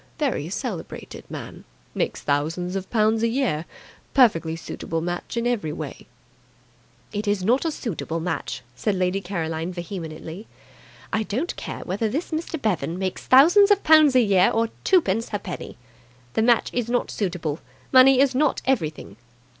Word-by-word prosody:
Very -, -, -1 dB
celebrated -, -, -6 dB
man! -, -, -8 dB, 0.3 s
Makes -, -, -2 dB
thousands 165 Hz, +6 st, -1 dB
of 195 Hz, -1 st, -4 dB
pounds 220 Hz, -1 st, +2 dB
a 230 Hz, -, +3 dB
year. 230 Hz, -, 0 dB, 0.5 s
Perfectly 170 Hz, -, +4 dB
suitable 165 Hz, 0 st, -4 dB
match 175 Hz, +7 st, -4 dB
in 235 Hz, -, 0 dB
every 230 Hz, -11 st, 0 dB
way." 150 Hz, -, -7 dB, 1.1 s
"It 205 Hz, +1 st, -3 dB
is 205 Hz, -2 st, +1 dB
not 245 Hz, -, +2 dB
a 325 Hz, -, +1 dB
suitable 175 Hz, -, -4 dB
match," 160 Hz, -6 st, -4 dB
said 200 Hz, +10 st, -1 dB
Lady 185 Hz, +1 st, 0 dB
Caroline 165 Hz, -2 st, -3 dB
vehemently. 175 Hz, +1 st, -7 dB, 0.7 s
"I 220 Hz, -, +2 dB
don't 245 Hz, -, -2 dB
care -, -, -6 dB
whether 205 Hz, +4 st, -2 dB
this 305 Hz, +11 st, -3 dB
Mr. 320 Hz, 0 st, -3 dB
Bevan 175 Hz, -, -1 dB
makes 185 Hz, -1 st, -4 dB
thousands 345 Hz, +10 st, +7 dB
of 405 Hz, -1 st, +3 dB
pounds 310 Hz, -3 st, +6 dB
a 255 Hz, -, +7 dB
year 195 Hz, -4 st, +4 dB
or 225 Hz, 0 st, +1 dB
twopence 230 Hz, -, +2 dB
ha'penny. 195 Hz, -, -6 dB, 0.6 s
The -, -, +1 dB
match 235 Hz, 0 st, +3 dB
is 240 Hz, -2 st, -1 dB
not 245 Hz, 0 st, 0 dB
suitable. 170 Hz, -6 st, -2 dB, 0.3 s
Money 260 Hz, 0 st, +7 dB
is 275 Hz, -2 st, +3 dB
not 285 Hz, +2 st, +2 dB
everything." 155 Hz, -, -2 dB
205 Hz, 155 wpm, -24 LUFS, 170-250 Hz, 1.1 s, thousands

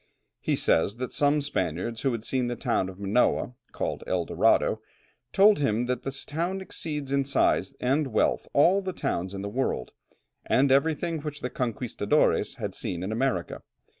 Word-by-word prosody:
He -, -, 0 dB
says 100 Hz, +6 st, +2 dB
that 125 Hz, +1 st, -5 dB
some 145 Hz, 0 st, +2 dB
Spaniards 95 Hz, -, -2 dB
who 135 Hz, -, +1 dB
had 115 Hz, -2 st, -4 dB
seen 125 Hz, 0 st, 0 dB
the 120 Hz, -, -2 dB
town 115 Hz, -7 st, 0 dB
of 95 Hz, 0 st, -11 dB
Manoa, 105 Hz, +4 st, +1 dB, 0.2 s
called -, -, -3 dB
El 90 Hz, -2 st, 0 dB
Dorado, -, -, +2 dB, 0.5 s
told 205 Hz, 0 st, +5 dB
him 120 Hz, -4 st, +1 dB
that 125 Hz, -1 st, -2 dB
this 135 Hz, 0 st, -4 dB
town 170 Hz, +5 st, -2 dB
exceeds 150 Hz, -7 st, -4 dB
in 140 Hz, 0 st, +2 dB
size 135 Hz, 0 st, +1 dB
and 140 Hz, +4 st, +1 dB
wealth 110 Hz, -4 st, +1 dB
all 180 Hz, +7 st, +4 dB
the 185 Hz, -1 st, -4 dB
towns 95 Hz, -, -2 dB
in 100 Hz, -, -5 dB
the -, -, -3 dB
world, 115 Hz, -, -2 dB, 0.5 s
and 135 Hz, +1 st, +3 dB
everything 160 Hz, +4 st, +2 dB
which 150 Hz, 0 st, -6 dB
the 125 Hz, -, -3 dB
"conquistadores" 120 Hz, -4 st, 0 dB
had -, -, -4 dB
seen 90 Hz, -1 st, -4 dB
in 95 Hz, -, -3 dB
America. 115 Hz, -6 st, -1 dB
130 Hz, 170 wpm, -27 LUFS, 110-145 Hz, 0.5 s, told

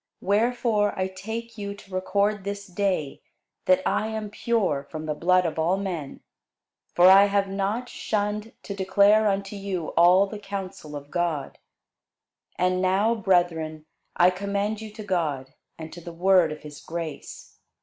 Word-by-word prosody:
Wherefore 215 Hz, 0 st, +1 dB
I 185 Hz, -, +1 dB
take 220 Hz, +4 st, -7 dB
you 200 Hz, 0 st, -4 dB
to 195 Hz, -1 st, -15 dB
record 200 Hz, +2 st, 0 dB
this 200 Hz, 0 st, -5 dB
day, 185 Hz, -6 st, -2 dB, 0.4 s
that 185 Hz, 0 st, +4 dB
I 215 Hz, -, +1 dB
am 220 Hz, -1 st, -5 dB
pure 210 Hz, -10 st, 0 dB
from 155 Hz, -1 st, -6 dB
the 155 Hz, -, -1 dB
blood 180 Hz, +4 st, +2 dB
of 160 Hz, -1 st, -2 dB
all 170 Hz, +4 st, +2 dB
men. 175 Hz, -8 st, -5 dB, 0.7 s
For 175 Hz, -, +6 dB
I 195 Hz, +2 st, +9 dB
have 200 Hz, 0 st, +1 dB
not 200 Hz, +5 st, -2 dB
shunned 210 Hz, -1 st, -3 dB
to 200 Hz, -, -5 dB
declare 200 Hz, +3 st, +4 dB
unto 195 Hz, 0 st, -1 dB
you 195 Hz, -4 st, -4 dB
all 180 Hz, +3 st, +5 dB
the 205 Hz, +1 st, -8 dB
counsel 195 Hz, -6 st, -7 dB
of 145 Hz, 0 st, -9 dB
God. 170 Hz, -5 st, -2 dB, 1.0 s
And 185 Hz, 0 st, +1 dB
now, 195 Hz, +5 st, +2 dB
brethren, 175 Hz, -7 st, 0 dB, 0.3 s
I 180 Hz, +1 st, +5 dB
commend 200 Hz, +3 st, -2 dB
you 220 Hz, -, -7 dB
to 215 Hz, +1 st, -9 dB
God, 150 Hz, -9 st, -2 dB, 0.2 s
and 160 Hz, 0 st, -8 dB
to 175 Hz, -, -9 dB
the 170 Hz, 0 st, -9 dB
word 180 Hz, -1 st, +4 dB
of 155 Hz, -, -7 dB
his 150 Hz, -1 st, -10 dB
grace. 165 Hz, -2 st, -7 dB
195 Hz, 160 wpm, -25 LUFS, 175-205 Hz, 1.0 s, I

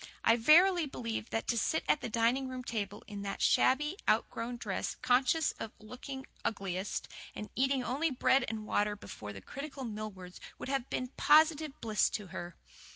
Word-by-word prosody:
I 225 Hz, -, +6 dB
verily 335 Hz, +7 st, +6 dB
believe 230 Hz, -4 st, -4 dB
that 225 Hz, -, -2 dB
to 235 Hz, -, +2 dB
sit 320 Hz, -, 0 dB
at 300 Hz, -, +3 dB
the -, -, -4 dB
dining 235 Hz, +4 st, +2 dB
room 255 Hz, -1 st, -5 dB
table, 210 Hz, -4 st, -4 dB
in 205 Hz, -1 st, -7 dB
that 200 Hz, 0 st, -4 dB
shabby, 295 Hz, +7 st, +3 dB
outgrown 240 Hz, +1 st, 0 dB
dress, 200 Hz, -5 st, -3 dB
conscious 260 Hz, +5 st, +3 dB
of 220 Hz, -, -5 dB
looking 265 Hz, +5 st, -8 dB
her -, -, -17 dB, 0.2 s
ugliest, 195 Hz, -2 st, -2 dB, 0.3 s
and 210 Hz, -, -7 dB
eating 265 Hz, 0 st, +2 dB
only 280 Hz, +7 st, 0 dB
bread 260 Hz, 0 st, +3 dB
and 220 Hz, -1 st, -4 dB
water 210 Hz, 0 st, +1 dB
before 105 Hz, -, -8 dB
the 100 Hz, -1 st, -9 dB
critical 275 Hz, -, -7 dB
Millwards 210 Hz, -5 st, -7 dB, 0.2 s
would -, -, -6 dB
have 270 Hz, -2 st, -1 dB
been 255 Hz, 0 st, -2 dB
positive 310 Hz, -1 st, +4 dB
bliss 215 Hz, -2 st, +2 dB
to 205 Hz, -4 st, -5 dB
her. 175 Hz, -2 st, -6 dB
240 Hz, 175 wpm, -32 LUFS, 210-275 Hz, 0.3 s, I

